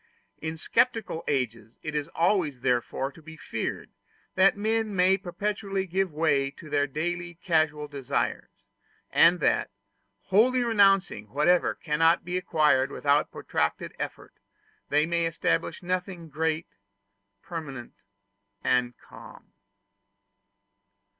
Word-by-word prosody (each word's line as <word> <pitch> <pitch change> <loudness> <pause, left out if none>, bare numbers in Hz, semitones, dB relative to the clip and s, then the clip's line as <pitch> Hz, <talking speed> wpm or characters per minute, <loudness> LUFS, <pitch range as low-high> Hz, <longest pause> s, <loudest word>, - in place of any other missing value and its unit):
In 160 0 -4
sceptical 225 -3 0
ages 115 -5 -2
it 155 - -4
is 150 -1 -2
always 165 -7 +1
therefore 125 +2 0
to 160 - -16
be 155 +1 -12
feared - - -4 0.4
that 195 +1 +4
men 220 0 0
may 185 +1 +4
perpetually 195 +1 -3
give 190 0 -1
way 150 -3 +1
to 150 +2 -13
their 145 -1 +2
daily 175 +4 -3
casual 155 -3 0
desires; 140 -3 -2 0.6
and 175 +2 +5
that, - - +2 0.5
wholly 245 +6 +3
renouncing 195 - +3
whatever 160 +7 +2
cannot 165 +2 +2
be 180 +1 -3
acquired 150 -7 +2
without 145 +1 +1
protracted - - -2
effort, - - -6 0.6
they 150 +1 +3
may 170 0 0
establish 85 - -1
nothing 180 -2 -3
great, 160 +2 -1 0.8
permanent, 140 -8 -7 0.7
and 125 -1 +1
calm. - - -15
165 Hz, 115 wpm, -27 LUFS, 145-185 Hz, 0.8 s, and